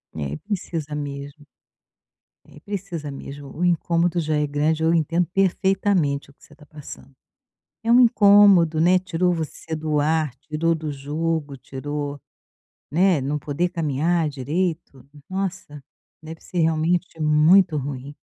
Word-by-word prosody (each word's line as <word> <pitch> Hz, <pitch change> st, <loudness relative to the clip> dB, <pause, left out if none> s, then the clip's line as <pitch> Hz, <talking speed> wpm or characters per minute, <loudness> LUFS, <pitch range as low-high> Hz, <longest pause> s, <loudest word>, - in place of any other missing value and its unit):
É, 70 Hz, -3 st, -4 dB
e -, -, -4 dB
precisa 160 Hz, -, -5 dB
mesmo. 145 Hz, 0 st, -7 dB, 1.0 s
É, -, -, -16 dB
precisa 175 Hz, -5 st, -6 dB
mesmo, 140 Hz, +1 st, -9 dB
o 180 Hz, -, 0 dB
incômodo 170 Hz, 0 st, +1 dB
já 155 Hz, -1 st, -1 dB
é 150 Hz, 0 st, 0 dB
grande, 155 Hz, +2 st, 0 dB
eu 165 Hz, +1 st, +3 dB
entendo 170 Hz, +2 st, +1 dB
perfeitamente 190 Hz, -6 st, +1 dB
o -, -, -18 dB
que -, -, -29 dB
você -, -, -18 dB
está 150 Hz, -, -18 dB
passando, 145 Hz, -2 st, -12 dB, 0.7 s
é 230 Hz, -, +1 dB
um 240 Hz, -, +7 dB
incômodo, 200 Hz, -8 st, +6 dB
né. 180 Hz, +3 st, +4 dB
Tirou 180 Hz, 0 st, 0 dB
você 160 Hz, 0 st, -5 dB
do 155 Hz, -1 st, -1 dB
ar, 155 Hz, -2 st, 0 dB
tirou 155 Hz, +4 st, -1 dB
do 155 Hz, -1 st, -5 dB
jogo, 145 Hz, +1 st, -3 dB
tirou 145 Hz, +2 st, -5 dB, 0.7 s
né, 175 Hz, 0 st, +3 dB
não 140 Hz, +3 st, -2 dB
poder 155 Hz, +5 st, -2 dB
caminhar 165 Hz, +1 st, 0 dB
direito, 150 Hz, +1 st, -3 dB, 0.2 s
nossa, 185 Hz, -6 st, -5 dB, 0.4 s
deve 160 Hz, +1 st, -9 dB
ser 180 Hz, -, -6 dB
realmente 165 Hz, +2 st, 0 dB
muito 155 Hz, +3 st, +4 dB
ruim. 140 Hz, 0 st, -5 dB
160 Hz, 140 wpm, -22 LUFS, 145-175 Hz, 1.0 s, um